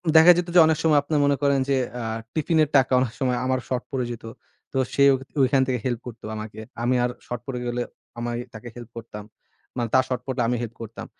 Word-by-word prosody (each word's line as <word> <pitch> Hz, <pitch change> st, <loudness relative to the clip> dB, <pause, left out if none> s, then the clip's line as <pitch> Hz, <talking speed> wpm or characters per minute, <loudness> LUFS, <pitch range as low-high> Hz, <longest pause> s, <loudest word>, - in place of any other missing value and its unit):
দেখা 160 Hz, +2 st, +10 dB
যেত 175 Hz, 0 st, 0 dB
যে -, -, +9 dB
অনেক 160 Hz, -1 st, +2 dB
সময় 155 Hz, -2 st, +5 dB
আপনারা 150 Hz, +1 st, 0 dB
মনে 140 Hz, 0 st, +3 dB
করেন 140 Hz, -1 st, +3 dB
যে, 135 Hz, -, +3 dB, 0.2 s
আ -, -, -4 dB, 0.3 s
টিফিনের 155 Hz, -1 st, +2 dB
টাকা 135 Hz, -1 st, +3 dB
অনেক 125 Hz, -3 st, -1 dB
সময় 125 Hz, -3 st, +1 dB
আমার 130 Hz, 0 st, +1 dB
শর্ট 130 Hz, -1 st, -2 dB
পড়ে 130 Hz, -3 st, -1 dB
যেত, 120 Hz, -, -8 dB, 0.5 s
তো -, -, -1 dB, 0.2 s
সে 140 Hz, -, +3 dB
ঐ -, -, +3 dB, 0.3 s
ঐখান 130 Hz, +1 st, +4 dB
থেকে 125 Hz, -2 st, 0 dB
হেল্প 120 Hz, -3 st, -1 dB
করতো 115 Hz, -2 st, -9 dB
আমাকে। 110 Hz, 0 st, -7 dB, 0.2 s
আমি 125 Hz, +1 st, +2 dB
আর 125 Hz, -, +1 dB, 0.2 s
শর্ট 120 Hz, -, -5 dB
পড়ে 130 Hz, -2 st, -3 dB
গেলে, 120 Hz, 0 st, -1 dB, 0.4 s
আমি 120 Hz, 0 st, -3 dB, 0.2 s
তাকে 110 Hz, +2 st, -9 dB
হেল্প 120 Hz, -1 st, -9 dB
করতাম। 105 Hz, -2 st, -8 dB, 0.5 s
মানে, 120 Hz, -1 st, 0 dB
তার 130 Hz, -, +6 dB
শর্ট 125 Hz, -1 st, -2 dB
পড়লে 130 Hz, -1 st, -1 dB
আমি 125 Hz, -, +1 dB
হেল্প 115 Hz, -1 st, -5 dB
করতাম। 115 Hz, 0 st, -7 dB
130 Hz, 225 wpm, -24 LUFS, 120-140 Hz, 0.5 s, দেখা